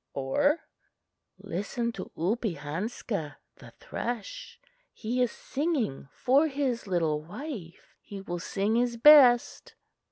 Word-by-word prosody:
Or 285 - +1 0.8
"Listen 230 +6 -3
to 190 -5 -8
Oopehanska 185 -2 -3 0.2
(the - - -13
thrush); 235 -4 -6 0.3
he 245 +3 -2
is 245 - +2
singing 270 - -2
for 275 +5 +3
his 270 -6 -2
little 165 -5 0
wife. 200 - -9
He 200 - -9
will 175 -2 -5
sing 200 +5 -1
his 240 -1 0
best." 255 -2 +6
225 Hz, 105 wpm, -28 LUFS, 175-250 Hz, 0.8 s, best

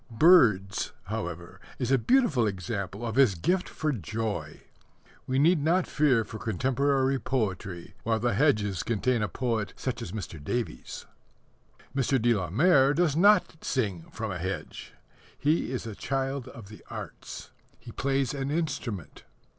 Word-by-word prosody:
Birds, 115 - +4
however, 90 -5 -6 0.2
is 125 0 -2
a 135 - +5
beautiful 160 - +3
example 100 +2 -4
of 115 +1 -3
his 130 -8 +5
gift 180 - 0
for 155 -1 -1
joy. 105 - -4 0.7
We 130 - 0
need 155 +2 +4
not 175 +3 +3
fear 135 -6 +2
for 110 0 -8
contemporary 135 +5 +1
poetry 95 -9 -3
while 110 0 0
the 120 +1 +1
hedges 105 - +2
contain 120 +1 0
a 105 - +1
poet 115 -5 -2
such 130 -2 -4
as 95 - -6
Mr. 95 -7 -6
Davies. 120 +8 -4 0.9
Mr. 135 0 +2
de 120 +1 +3
la 95 -6 -2
Mare 140 - +4
does 170 -4 +2
not 195 -2 +4
sing 100 -10 -1
from 110 -2 -4
a 90 - -4
hedge. 95 +3 -5 0.4
He 150 -2 +1
is 125 -2 -3
a 110 - -5
child 135 +3 -2
of 110 -4 -11
the 105 - -13
arts. - - -8 0.3
He - - -11
plays 135 -1 0
an 135 -1 -3
instrument. 135 - -3
120 Hz, 150 wpm, -28 LUFS, 100-140 Hz, 0.9 s, a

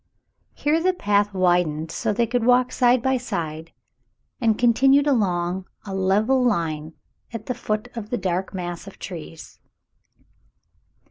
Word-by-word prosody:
Here 310 +3 +1
the 370 +1 +2
path 205 - +1
wid 180 -2 +3
ened 155 +2 -5
so - - -1
they 235 +3 +1
could 240 +1 -1
walk 250 +1 +4
side 245 -1 +3
by 265 -1 +2
side, 165 -8 -5 0.7
and 225 -4 +2
continued 270 +4 +4
along 185 -8 0 0.2
a 195 - -6
level 210 +7 +2
line 160 -8 -1 0.4
at 230 -2 -7
the 250 - -2
foot 215 -2 -3
of 215 -3 -6
the 245 - -1
dark 185 -2 -2
mass 175 -1 -6
of 195 - -11
trees. 165 -2 -9
205 Hz, 145 wpm, -23 LUFS, 175-245 Hz, 0.7 s, walk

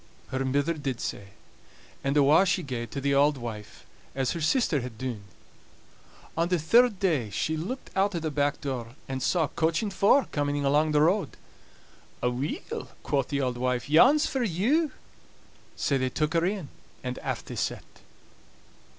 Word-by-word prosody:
Her 130 0 -1
mither 140 +5 +1
did 140 -6 -4
sae; 100 - -5 0.8
and 140 +2 +1
awa' 145 +5 +6
she 180 0 +1
gaed 125 -5 -4
to 140 - -4
the 140 +1 +1
auld 145 +1 +4
wife, 110 -4 -8 0.3
as 135 -2 0
her 170 - -4
sister 155 - +2
had 120 -2 -7
dune. 120 -5 -5 1.1
On 165 +1 +1
the 180 0 +1
third 220 +6 +4
day 155 - +1
she 155 +10 -1
looked 215 +12 -5
out 195 0 +2
o' - - 0
the 160 -1 -3
back 145 0 0
door, 125 -4 -4
and 130 -1 -4
saw 175 +4 +2
a - - 0
coach 165 +3 0
and 205 -2 -3
four 235 +8 +4
coming 145 -1 -1
along 150 +3 +3
the 150 - +4
road. 185 +6 +1 0.9
"Aweel," 125 +4 -3 0.2
quo' 140 - +1
the 140 +1 -2
auld 125 -2 -1
wife, 125 +2 -1
"yon's 275 - +6
for 265 - -1
you." 245 - +1 0.8
Sae 140 - +1
they 130 -1 0
took 150 +4 -1
her 165 0 +2
in, 190 -7 -3 0.3
and 125 0 -4
aff - - -4
they - - -7
set. - - -3
145 Hz, 175 wpm, -27 LUFS, 130-175 Hz, 1.1 s, awa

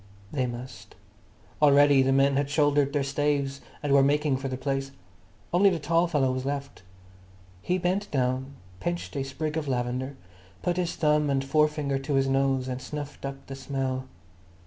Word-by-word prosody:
They 130 -4 0
must. 120 0 -8 0.7
Already 145 -1 +6
the 135 0 +2
men 135 +1 +4
had 140 0 0
shouldered 145 -1 +2
their 145 -1 0
staves 140 0 -1 0.2
and 145 -1 +1
were 140 - +7
making 145 0 +2
for 135 +1 -4
the 130 -1 -3
place. 135 0 -2 0.6
Only 195 +3 +6
the 180 - 0
tall 165 +3 +2
fellow 140 -6 +1
was 130 0 -3
left. 140 -3 -4 0.8
He 180 - 0
bent 185 +3 -1
down, 130 0 -1 0.2
pinched 175 - -3
a 135 - -1
sprig 150 +3 -3
of 155 -2 -2
lavender, 130 +1 -2 0.5
put 175 0 0
his 175 -2 -1
thumb 150 -2 +2
and 135 -1 0
forefinger 150 -1 +1
to 140 +1 -2
his 135 0 +3
nose 135 -1 +1
and 130 0 -4
snuffed 145 +1 -6
up 135 0 -8
the 135 - -8
smell. 135 -1 -3
140 Hz, 170 wpm, -27 LUFS, 135-150 Hz, 0.8 s, were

